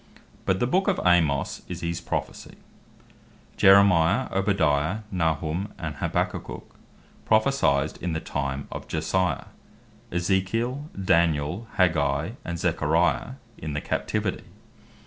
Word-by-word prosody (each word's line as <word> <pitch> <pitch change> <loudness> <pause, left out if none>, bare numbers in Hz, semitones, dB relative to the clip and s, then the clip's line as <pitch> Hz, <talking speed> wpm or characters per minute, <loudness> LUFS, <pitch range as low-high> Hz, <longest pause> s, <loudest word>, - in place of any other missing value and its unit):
But 95 0 +2
the - - +2
Book 185 +10 +1
of 195 -3 +2
Amos 80 -6 +2
is 90 -1 -6
his 85 0 -3
Prophecy. - - -5 1.0
Jeremiah, 100 +3 +5
Abdias, 95 -1 +1
Nahum, 80 +1 -1
and 80 -6 -5
Habakkuk - - -3 0.5
prophecyed 110 - +2
in 90 -2 -2
the 80 - -1
time 70 -2 -3
of - - -7
Josiah. 95 -1 0 0.7
Ezekiel, 115 - -1
Daniel, 85 +1 +1
Aggeus, 80 -2 +2
and 85 0 -4
Zacharias, 80 -5 +1 0.2
in 75 -1 -5
the 75 - -2
Captivity. - - -2
85 Hz, 110 wpm, -25 LUFS, 75-100 Hz, 1.0 s, Jeremiah